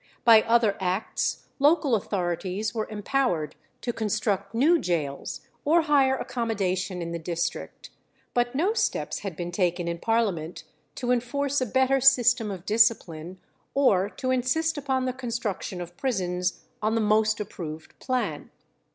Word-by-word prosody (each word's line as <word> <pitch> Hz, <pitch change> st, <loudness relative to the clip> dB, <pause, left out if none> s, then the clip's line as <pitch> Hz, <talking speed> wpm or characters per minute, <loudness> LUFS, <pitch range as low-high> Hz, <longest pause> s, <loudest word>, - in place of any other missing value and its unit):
By 225 Hz, -2 st, +8 dB
other 225 Hz, -2 st, +2 dB
acts 190 Hz, +3 st, -1 dB
local 290 Hz, -1 st, +3 dB
authorities 190 Hz, 0 st, -1 dB
were 220 Hz, -2 st, -2 dB
empowered 205 Hz, -, -1 dB, 0.3 s
to 240 Hz, -, -2 dB
construct 210 Hz, -2 st, -1 dB
new 320 Hz, +8 st, +4 dB
gaols 150 Hz, -6 st, -2 dB, 0.2 s
or 325 Hz, +3 st, +4 dB
hire 275 Hz, -3 st, +3 dB
accommodation 190 Hz, -7 st, -2 dB
in 170 Hz, -, -5 dB
the 170 Hz, -, -3 dB
district; 170 Hz, +1 st, -4 dB, 0.4 s
but 245 Hz, +1 st, 0 dB
no 365 Hz, +10 st, +2 dB
steps -, -, -1 dB
had 195 Hz, -5 st, -5 dB
been 175 Hz, +1 st, -4 dB
taken 175 Hz, -1 st, 0 dB
in 170 Hz, 0 st, -3 dB
Parliament 195 Hz, -8 st, -1 dB, 0.3 s
to 245 Hz, -1 st, -1 dB
enforce 270 Hz, +3 st, 0 dB
a 255 Hz, -, 0 dB
better 265 Hz, +3 st, +2 dB
system 245 Hz, -4 st, +5 dB
of 190 Hz, -3 st, -7 dB
discipline, 190 Hz, -6 st, +1 dB, 0.4 s
or 205 Hz, -9 st, +3 dB
to 255 Hz, +4 st, -3 dB
insist 260 Hz, +6 st, +1 dB
upon 265 Hz, -3 st, -1 dB
the 255 Hz, -, -1 dB
construction 230 Hz, -7 st, -4 dB
of 175 Hz, 0 st, -7 dB
prisons 180 Hz, -8 st, -1 dB, 0.2 s
on 215 Hz, +1 st, +1 dB
the -, -, +2 dB
most 215 Hz, 0 st, +2 dB
approved 160 Hz, -6 st, -7 dB
plan. 255 Hz, -1 st, -2 dB
220 Hz, 145 wpm, -26 LUFS, 180-255 Hz, 0.4 s, By